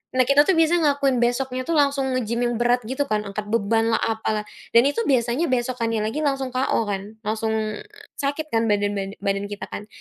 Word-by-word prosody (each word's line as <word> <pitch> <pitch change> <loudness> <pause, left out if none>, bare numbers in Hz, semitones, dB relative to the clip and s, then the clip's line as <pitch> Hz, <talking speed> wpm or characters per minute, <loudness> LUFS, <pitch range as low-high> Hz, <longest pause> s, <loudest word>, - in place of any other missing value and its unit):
Nah, 255 -1 +3
kita 280 +1 +6
tuh 380 - +4
biasa 325 +1 +4
ngelakuin 280 -3 +2
besoknya 255 +1 -1
tuh 335 - -4
langsung 275 -2 +2
nge-gym 235 -1 -1
yang 240 -1 0
berat 245 0 +2
gitu 265 +3 -1
kan 215 -4 0
angkat 205 +1 -5
bebanlah, 225 +1 +1
apalah. 220 -1 -1 0.3
Dan 235 - +8
itu 460 - -1
biasanya 255 +4 +1
besokannya 235 -3 0
lagi 225 +8 -2
langsung 270 -2 0
KO 255 -2 +1
kan, 200 +2 -4
langsung 220 +1 -1 0.7
sakit 290 +2 -2
kan 225 0 +2
badan 205 -1 +1
bada 195 0 -4
badan 200 0 -1
kita 205 0 -6
kan. 210 - -6
240 Hz, 190 wpm, -23 LUFS, 215-270 Hz, 0.7 s, Dan